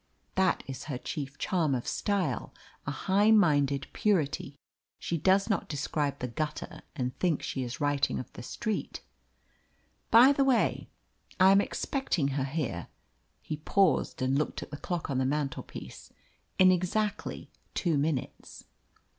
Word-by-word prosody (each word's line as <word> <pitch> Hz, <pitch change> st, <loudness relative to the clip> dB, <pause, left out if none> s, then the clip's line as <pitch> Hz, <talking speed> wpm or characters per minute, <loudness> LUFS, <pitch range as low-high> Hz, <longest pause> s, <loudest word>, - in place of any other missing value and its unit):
That 190 Hz, -1 st, +2 dB
is 135 Hz, -1 st, -7 dB
her 145 Hz, -5 st, -3 dB
chief 140 Hz, +1 st, -5 dB
charm 160 Hz, -7 st, +1 dB
of 120 Hz, -, -3 dB
style, 190 Hz, -, -1 dB, 0.3 s
a -, -, 0 dB
high 200 Hz, +9 st, +2 dB
minded 145 Hz, -10 st, +4 dB
purity. 150 Hz, -8 st, 0 dB, 0.4 s
She 170 Hz, -, -3 dB
does 190 Hz, +5 st, +3 dB
not 205 Hz, -, -1 dB
describe 145 Hz, -1 st, -1 dB
the 125 Hz, -, -3 dB
gutter 150 Hz, +5 st, -4 dB
and 125 Hz, -2 st, -2 dB
think 175 Hz, -5 st, +1 dB
she 135 Hz, -, -3 dB
is 120 Hz, -1 st, -5 dB
writing 145 Hz, -2 st, +1 dB
of 125 Hz, -, -7 dB
the -, -, -8 dB
street. 215 Hz, -, -4 dB, 1.1 s
By 245 Hz, +4 st, +8 dB
the 280 Hz, -1 st, +3 dB
way, 260 Hz, -4 st, +1 dB, 0.5 s
I 190 Hz, +1 st, +7 dB
am 195 Hz, +1 st, +6 dB
expecting 200 Hz, -, -1 dB
her 135 Hz, -1 st, -1 dB
here" 135 Hz, -, -3 dB, 0.6 s
(he 155 Hz, -, -4 dB
paused, 160 Hz, -3 st, +1 dB
and 135 Hz, +2 st, +2 dB
looked 150 Hz, -, -2 dB
at -, -, -12 dB
the 145 Hz, -, -5 dB
clock 175 Hz, -1 st, -3 dB
on 130 Hz, -, 0 dB
the -, -, +2 dB
mantelpiece) 140 Hz, 0 st, -4 dB, 0.5 s
"in 185 Hz, 0 st, +7 dB
exactly 190 Hz, +4 st, -1 dB, 0.2 s
two 170 Hz, -4 st, +1 dB
minutes." 145 Hz, -2 st, -3 dB
150 Hz, 145 wpm, -29 LUFS, 135-190 Hz, 1.1 s, By